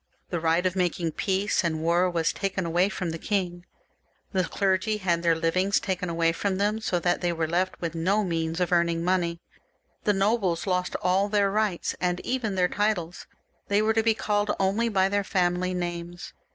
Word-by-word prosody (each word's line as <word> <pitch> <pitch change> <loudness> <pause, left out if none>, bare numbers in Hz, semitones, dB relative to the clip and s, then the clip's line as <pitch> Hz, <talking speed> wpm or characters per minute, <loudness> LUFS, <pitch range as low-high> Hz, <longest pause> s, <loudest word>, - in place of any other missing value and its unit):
The 175 - -1
right 165 +2 +1
of 185 0 +1
making 175 -2 0
peace 195 +4 0
and 160 -2 -1
war 175 +2 +3
was 165 -2 0
taken 195 -2 -2
away 175 +4 +2
from 180 -4 -3
the 165 - -5
king; 180 -3 -2 0.6
the 185 -2 +1
clergy 195 +3 0
had 175 -4 0
their 170 -1 +3
livings 185 +5 +1
taken 185 -2 -3
away 165 0 +2
from 190 +3 -2
them, 210 +2 +1
so 185 -4 0
that 175 0 0
they 175 -1 +1
were 165 -1 -1
left 180 +3 -1
with 165 -2 -3
no 190 +6 +1
means 165 -2 -2
of 180 -1 0
earning 170 -1 +2
money; 170 -2 0 0.6
the 210 - +3
nobles 195 -3 +1
lost 180 -2 -1
all 190 +3 +2
their 200 -1 +2
rights, 210 -4 0
and 180 -1 0
even 240 -6 -2
their 180 -1 +3
titles; 195 -4 -2 0.4
they 200 0 +2
were 215 +1 +2
to 225 - +3
be 225 0 +2
called 205 -1 0
only 200 +5 +1
by 190 -3 +2
their 200 +1 0
family 180 -1 0
names. 175 0 -5
185 Hz, 190 wpm, -26 LUFS, 170-200 Hz, 0.6 s, war